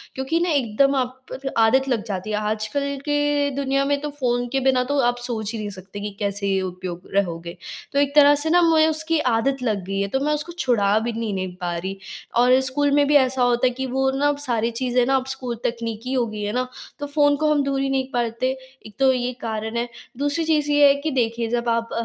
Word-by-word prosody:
क्योंकि 265 Hz, +5 st, -1 dB
ना 350 Hz, +1 st, 0 dB
एकदम 275 Hz, -1 st, +2 dB
आप 260 Hz, 0 st, -3 dB, 0.3 s
आदत 255 Hz, +4 st, +4 dB
लग 230 Hz, -5 st, 0 dB
जाती 195 Hz, 0 st, -4 dB
है। -, -, 0 dB
आजकल 215 Hz, +6 st, -2 dB, 0.2 s
के 290 Hz, -1 st, +1 dB
दुनिया 275 Hz, 0 st, 0 dB
में 285 Hz, 0 st, +1 dB
तो 295 Hz, -, -3 dB
फ़ोन 245 Hz, -2 st, 0 dB
के 270 Hz, -, +1 dB
बिना 255 Hz, -1 st, +3 dB
तो 285 Hz, -, +1 dB
आप 245 Hz, 0 st, 0 dB
सोच 225 Hz, -4 st, -3 dB
ही -, -, -3 dB
नहीं 210 Hz, -1 st, -4 dB
सकते 195 Hz, +1 st, -9 dB
कि 205 Hz, +1 st, -4 dB
कैसे 200 Hz, -1 st, 0 dB
उपयोग 180 Hz, -1 st, -5 dB
रहोगे? 170 Hz, -3 st, -1 dB, 0.4 s
तो 280 Hz, -, +2 dB
एक 285 Hz, 0 st, +1 dB
तरह 290 Hz, -1 st, +7 dB
से 295 Hz, +2 st, -1 dB
ना 350 Hz, +2 st, +5 dB
मैं 320 Hz, -2 st, +5 dB
उसकी 315 Hz, +1 st, 0 dB
आदत 230 Hz, +4 st, +1 dB
लग 210 Hz, -5 st, -1 dB
गई 195 Hz, +1 st, -3 dB
है। 200 Hz, -, 0 dB
तो 265 Hz, +7 st, -1 dB
मैं 300 Hz, -, +2 dB
उसको 300 Hz, +3 st, -3 dB
छुड़ा 215 Hz, -7 st, +2 dB
भी 235 Hz, +2 st, -2 dB
नहीं 225 Hz, -2 st, -3 dB
नहीं 185 Hz, -1 st, -4 dB
पा 175 Hz, -1 st, -2 dB
रही 190 Hz, +3 st, -5 dB, 0.4 s
और 250 Hz, +1 st, +5 dB
स्कूल 285 Hz, +2 st, +1 dB
में 290 Hz, 0 st, +4 dB
भी 295 Hz, -, +3 dB
ऐसा 260 Hz, -2 st, +3 dB
होता 245 Hz, +1 st, +3 dB
है -, -, 0 dB
कि 265 Hz, -, -1 dB
वो 265 Hz, +1 st, +1 dB
ना 290 Hz, +1 st, +3 dB
सारी 235 Hz, -2 st, 0 dB
चीज़ें 250 Hz, -1 st, +2 dB
ना 270 Hz, +2 st, +2 dB
अब 260 Hz, -1 st, 0 dB
स्कूल 260 Hz, -3 st, -4 dB
तकनीकी 230 Hz, +1 st, -3 dB
हो 250 Hz, -2 st, +2 dB
गई 215 Hz, -1 st, -6 dB
हैं 205 Hz, +1 st, -2 dB
ना 255 Hz, +1 st, -1 dB, 0.3 s
तो 290 Hz, -, -4 dB
फ़ोन 290 Hz, 0 st, +3 dB
को 305 Hz, -, +3 dB
हम 290 Hz, -1 st, +2 dB
दूर 275 Hz, -1 st, -1 dB
ही 270 Hz, -, 0 dB
नहीं 265 Hz, -1 st, 0 dB
परते 240 Hz, +1 st, 0 dB, 0.3 s
एक 215 Hz, -, -12 dB
तो 265 Hz, -1 st, +5 dB
ये 250 Hz, 0 st, -2 dB
कारण 220 Hz, 0 st, -3 dB
है। 235 Hz, +1 st, -1 dB, 0.3 s
दूसरी 290 Hz, +4 st, 0 dB
चीज़ 300 Hz, -2 st, +1 dB
ये 290 Hz, 0 st, +6 dB
है 280 Hz, -, +5 dB
कि 310 Hz, +1 st, -1 dB
देखिए 230 Hz, -3 st, 0 dB
जब 235 Hz, 0 st, -1 dB
आप 230 Hz, 0 st, 0 dB
250 Hz, 235 wpm, -22 LUFS, 220-280 Hz, 0.4 s, तरह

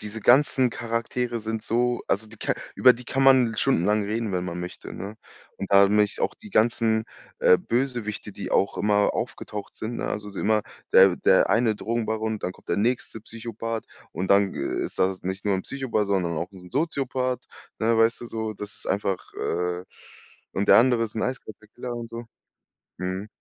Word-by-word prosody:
diese 105 Hz, +1 st, -5 dB
ganzen 130 Hz, +1 st, +4 dB
Charaktere 115 Hz, +1 st, -2 dB
sind 110 Hz, 0 st, -3 dB
so 120 Hz, +1 st, +1 dB
also, 110 Hz, +3 st, +1 dB
die 110 Hz, -, -13 dB
Char -, -, +1 dB, 0.2 s
über 125 Hz, -, +7 dB
die 125 Hz, +1 st, -11 dB
kann 135 Hz, +3 st, -1 dB
man 130 Hz, -3 st, +6 dB
l 110 Hz, -, -6 dB
stundenlang 105 Hz, -4 st, +2 dB
reden, 110 Hz, 0 st, -2 dB
wenn 90 Hz, -1 st, -1 dB
man 90 Hz, -1 st, -4 dB
möchte, 90 Hz, 0 st, -7 dB
ne, 100 Hz, +3 st, -7 dB, 0.4 s
und 100 Hz, -, -5 dB
da 100 Hz, 0 st, +7 dB
nämlich 105 Hz, 0 st, +2 dB
auch -, -, 0 dB
die 215 Hz, -2 st, -14 dB
ganzen, 110 Hz, -, +2 dB, 0.4 s
äh, 90 Hz, -, +6 dB
Bösewichte, 120 Hz, -4 st, -2 dB
die -, -, -6 dB
auch 100 Hz, -, +2 dB
immer 105 Hz, 0 st, +2 dB
aufgetaucht 110 Hz, -3 st, -5 dB
sind, 115 Hz, +2 st, -4 dB
ne? -, -, -3 dB
Also, 105 Hz, 0 st, -4 dB
immer 110 Hz, 0 st, +2 dB, 0.3 s
der 95 Hz, -2 st, +7 dB
der 95 Hz, -, +4 dB
eine 110 Hz, -2 st, +3 dB
Drogenbaron, 110 Hz, -1 st, -2 dB
dann 90 Hz, -, -3 dB
kommt -, -, -22 dB
der -, -, +1 dB
nächste 115 Hz, 0 st, -1 dB
Psychopath 115 Hz, 0 st, -5 dB, 0.3 s
und 95 Hz, +3 st, -3 dB
dann 100 Hz, 0 st, +4 dB
ist -, -, -3 dB
das 95 Hz, 0 st, +1 dB
nicht 95 Hz, +2 st, -4 dB
nur 100 Hz, -2 st, +2 dB
'n 95 Hz, -, -4 dB
Psychopath, 130 Hz, -7 st, -1 dB
sondern 90 Hz, -4 st, 0 dB
auch 85 Hz, -, -4 dB
'n 90 Hz, -2 st, -13 dB
Soziopath, 130 Hz, -4 st, -1 dB, 0.4 s
ne, 115 Hz, +1 st, +3 dB
weißt 115 Hz, +1 st, +3 dB
du? -, -, -6 dB
So, 110 Hz, -1 st, -3 dB
ddas 105 Hz, 0 st, -7 dB
ist -, -, -7 dB
einfach, 95 Hz, -1 st, -2 dB
äh 90 Hz, 0 st, -2 dB, 0.7 s
und 100 Hz, -, -1 dB
der -, -, +9 dB
andere 120 Hz, -1 st, +4 dB
ist 110 Hz, 0 st, -8 dB
'n 110 Hz, -, -1 dB
eiskalter 110 Hz, -5 st, -6 dB
Killer 120 Hz, 0 st, -5 dB
und 115 Hz, -1 st, -6 dB
so. 115 Hz, +1 st, -6 dB, 0.7 s
Mhm. 95 Hz, +3 st, -3 dB
110 Hz, 190 wpm, -25 LUFS, 100-120 Hz, 0.7 s, der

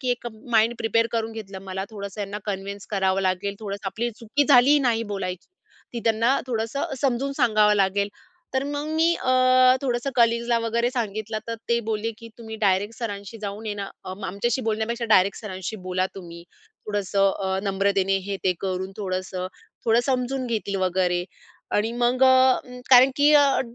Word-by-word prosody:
की 255 Hz, -2 st, -1 dB
एक 245 Hz, 0 st, -2 dB, 0.2 s
mind 230 Hz, +1 st, +3 dB
prepare 230 Hz, +1 st, +2 dB
करून 225 Hz, -1 st, -1 dB
घेतलं. 205 Hz, -3 st, -8 dB
मला 190 Hz, 0 st, -4 dB
थोडंसं 200 Hz, -1 st, -7 dB
यांना 205 Hz, 0 st, -4 dB
कन्विन्स 200 Hz, 0 st, -5 dB
करावं 190 Hz, -2 st, +1 dB
लागेल 190 Hz, +2 st, -1 dB
थोडंसं 200 Hz, -1 st, -6 dB
आपली 235 Hz, +5 st, -3 dB
चुकी 260 Hz, +6 st, 0 dB
झाली 280 Hz, +2 st, +6 dB
नाही 240 Hz, -4 st, +1 dB
बोलायची. 185 Hz, -2 st, -4 dB, 0.5 s
ती 235 Hz, -, -4 dB
त्यांना 230 Hz, +4 st, +3 dB
थोडंसं 235 Hz, +3 st, -2 dB
समजून 275 Hz, 0 st, 0 dB
सांगावं 215 Hz, -5 st, +4 dB
लागेल. 200 Hz, 0 st, +1 dB, 0.5 s
तर 265 Hz, +1 st, +1 dB
मग 290 Hz, +1 st, -3 dB
मी 330 Hz, +1 st, +4 dB
अ, 255 Hz, -, -2 dB, 0.5 s
थोडंसं 250 Hz, 0 st, -1 dB
कलीग्सला 235 Hz, 0 st, +3 dB
वगैरे 230 Hz, +1 st, 0 dB
सांगितलं 220 Hz, -3 st, -3 dB
तर 230 Hz, -, -2 dB
ते 235 Hz, 0 st, +3 dB
बोलले 220 Hz, +1 st, -1 dB
की 230 Hz, -, -11 dB
तुम्ही 220 Hz, -1 st, -8 dB
डायरेक्ट 205 Hz, +1 st, +1 dB
सरांशी 205 Hz, -1 st, -6 dB
जाऊन 205 Hz, +2 st, -5 dB
ये 210 Hz, -, -2 dB
ना 200 Hz, -1 st, -5 dB, 0.2 s
आमच्याशी 200 Hz, +6 st, -2 dB
बोलण्यापेक्षा 225 Hz, +2 st, -1 dB
डायरेक्ट 190 Hz, +1 st, +3 dB
सरांशी 190 Hz, 0 st, -5 dB
बोला 185 Hz, 0 st, +1 dB
तुम्ही. 170 Hz, -3 st, -10 dB, 0.4 s
थोडंसं 200 Hz, -1 st, +1 dB
अ, 190 Hz, 0 st, 0 dB
नम्रतेने 195 Hz, 0 st, +1 dB
हे 200 Hz, -1 st, -2 dB
ते 185 Hz, -, +3 dB
करून 190 Hz, 0 st, -3 dB
थोडंसं 185 Hz, -2 st, -3 dB, 0.4 s
थोडं 230 Hz, +1 st, +4 dB
समजून 260 Hz, 0 st, -1 dB
घेतील 215 Hz, -4 st, -2 dB
वगैरे 180 Hz, -1 st, 0 dB, 0.5 s
आणि 215 Hz, +2 st, +1 dB
मग 245 Hz, +2 st, +1 dB
अ, 260 Hz, 0 st, +5 dB, 0.3 s
कारण 260 Hz, +1 st, +8 dB
की 290 Hz, 0 st, +5 dB
अ, 285 Hz, -2 st, +5 dB
220 Hz, 165 wpm, -24 LUFS, 195-240 Hz, 0.5 s, कारण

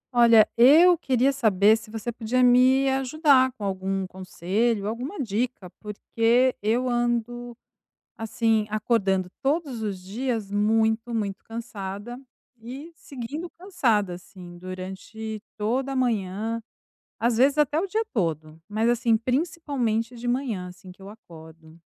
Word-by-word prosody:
Olha, 230 Hz, -2 st, +7 dB
eu 310 Hz, +9 st, +7 dB
queria 270 Hz, -4 st, +1 dB
saber 215 Hz, -5 st, +4 dB
se 220 Hz, -1 st, -9 dB
você 225 Hz, +2 st, -4 dB
podia 245 Hz, +2 st, 0 dB
me 255 Hz, +2 st, +5 dB
ajudar 270 Hz, 0 st, +3 dB
com 225 Hz, -, -10 dB
algum 195 Hz, 0 st, -2 dB
conselho, 195 Hz, +4 st, -2 dB
alguma 250 Hz, -, -5 dB
dica, 225 Hz, -5 st, -3 dB
porque 230 Hz, +4 st, +1 dB
eu 230 Hz, +5 st, +1 dB
ando, 240 Hz, 0 st, -2 dB, 0.6 s
assim, 225 Hz, -1 st, 0 dB
acordando 200 Hz, -4 st, 0 dB
todos 275 Hz, -4 st, -1 dB
os 205 Hz, -3 st, -3 dB
dias 215 Hz, +2 st, -4 dB
muito, 220 Hz, +3 st, +1 dB
muito 200 Hz, -3 st, -3 dB
cansada 225 Hz, 0 st, -7 dB, 0.4 s
e 270 Hz, +8 st, -9 dB
seguindo 290 Hz, +4 st, -7 dB
cansada, 235 Hz, -, 0 dB
assim, 175 Hz, 0 st, -11 dB
durante 190 Hz, +4 st, -7 dB, 0.2 s
toda 255 Hz, +6 st, -1 dB
a -, -, -3 dB
manhã, 225 Hz, -2 st, -1 dB, 0.6 s
às 235 Hz, 0 st, +1 dB
vezes, 275 Hz, +5 st, +3 dB
até 300 Hz, 0 st, +2 dB
o 340 Hz, -, +1 dB
dia 435 Hz, +4 st, -1 dB
todo. 160 Hz, -, -2 dB
Mas, 215 Hz, +2 st, 0 dB
assim, 235 Hz, -1 st, +2 dB
principalmente 250 Hz, -4 st, -1 dB
de 235 Hz, +1 st, -9 dB
manhã, 240 Hz, -7 st, -2 dB
assim, 180 Hz, +1 st, -14 dB
que 180 Hz, +1 st, -15 dB
eu 195 Hz, -, -10 dB
acordo, 160 Hz, -5 st, -15 dB
230 Hz, 130 wpm, -25 LUFS, 200-255 Hz, 0.6 s, Olha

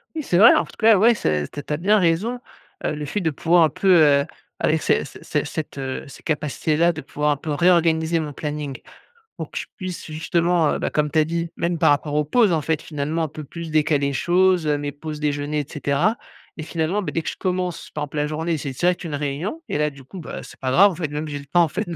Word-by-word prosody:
Oui, 310 Hz, -, -3 dB
c'est 175 Hz, -, +1 dB
vrai. 225 Hz, +5 st, +9 dB
En -, -, +2 dB
tout -, -, -15 dB
cas, 220 Hz, -2 st, +6 dB
ouais, 230 Hz, +4 st, +5 dB
c'est 75 Hz, -, -1 dB
t 145 Hz, -, -8 dB
tu 150 Hz, -, -4 dB
as -, -, 0 dB
bien 205 Hz, +6 st, +3 dB
raison, 190 Hz, +8 st, +1 dB, 0.4 s
heu, -, -, 0 dB
le 150 Hz, 0 st, -5 dB
fait 205 Hz, +9 st, -2 dB
de 165 Hz, -, +1 dB
pouvoir 165 Hz, +3 st, +3 dB
un 160 Hz, -, +4 dB
peu, 190 Hz, +5 st, +3 dB
heu, 145 Hz, -3 st, +5 dB, 0.3 s
avec -, -, +1 dB
ces -, -, +1 dB
ces -, -, -13 dB
ces -, -, -1 dB
cette, 155 Hz, -2 st, -5 dB
heu, 135 Hz, -1 st, -4 dB
ces 140 Hz, -, -13 dB
capacités 150 Hz, 0 st, -1 dB
là, 170 Hz, +3 st, +4 dB
de 160 Hz, -, -7 dB
pouvoir 150 Hz, +2 st, -1 dB
un 145 Hz, -, 0 dB
peu 155 Hz, +1 st, -5 dB
réorganiser 165 Hz, 0 st, +3 dB
mon 150 Hz, -2 st, -4 dB
planning, 145 Hz, -2 st, -4 dB, 0.6 s
pour -, -, -7 dB
que -, -, -7 dB
je -, -, -5 dB
puisse 185 Hz, -3 st, -6 dB
justement, 165 Hz, +1 st, +1 dB
heu, -, -, -3 dB
bah, -, -, -1 dB
comme 150 Hz, -1 st, 0 dB
tu 160 Hz, -, +3 dB
as 155 Hz, -, +4 dB
dit 170 Hz, +1 st, -2 dB
même 170 Hz, 0 st, -1 dB
par -, -, +4 dB
rapport 145 Hz, +1 st, +1 dB
aux 150 Hz, -, +3 dB
pauses, 210 Hz, +4 st, +3 dB
en 155 Hz, -, +1 dB
fait 160 Hz, +1 st, -1 dB
finalement 155 Hz, +2 st, -2 dB
un -, -, -1 dB
peu 155 Hz, +1 st, -9 dB
plus 165 Hz, +3 st, -8 dB
décaler 155 Hz, -2 st, +2 dB
les 140 Hz, -, -2 dB
choses, 180 Hz, +3 st, +2 dB
heu, 150 Hz, -1 st, +1 dB
mes 145 Hz, 0 st, -4 dB
pauses 150 Hz, +1 st, -7 dB
déjeuner, 150 Hz, 0 st, -1 dB
et 145 Hz, -, -2 dB
cetera 150 Hz, +10 st, 0 dB, 0.4 s
et 155 Hz, -, -7 dB
finalement, 165 Hz, +5 st, -1 dB
beh 190 Hz, -, -4 dB
dès 165 Hz, -, -2 dB
que -, -, -2 dB
je -, -, -10 dB
commence, 180 Hz, -2 st, -3 dB
par 150 Hz, -, -4 dB
exemple, 150 Hz, +1 st, -6 dB
la 150 Hz, 0 st, +1 dB
journée, 160 Hz, +2 st, -2 dB
c'est 140 Hz, -, -4 dB
direct 175 Hz, +8 st, 0 dB
une 160 Hz, -4 st, -4 dB
réunion 150 Hz, -, -4 dB
et -, -, -1 dB
là 150 Hz, 0 st, +2 dB
du 140 Hz, -2 st, -14 dB
coup, 185 Hz, +9 st, -10 dB
bah, 160 Hz, -, -7 dB
c'est -, -, -13 dB
pas 130 Hz, -, -2 dB
grave 195 Hz, +10 st, +6 dB
en -, -, -7 dB
fait. 165 Hz, -1 st, -2 dB
Même 150 Hz, +2 st, -4 dB
j'ai 145 Hz, -1 st, -5 dB
le 140 Hz, -, -13 dB
temps 175 Hz, +5 st, +4 dB
en -, -, +2 dB
fait, 155 Hz, -, -4 dB
de 170 Hz, -, -4 dB
155 Hz, 275 wpm, -22 LUFS, 145-175 Hz, 0.6 s, vrai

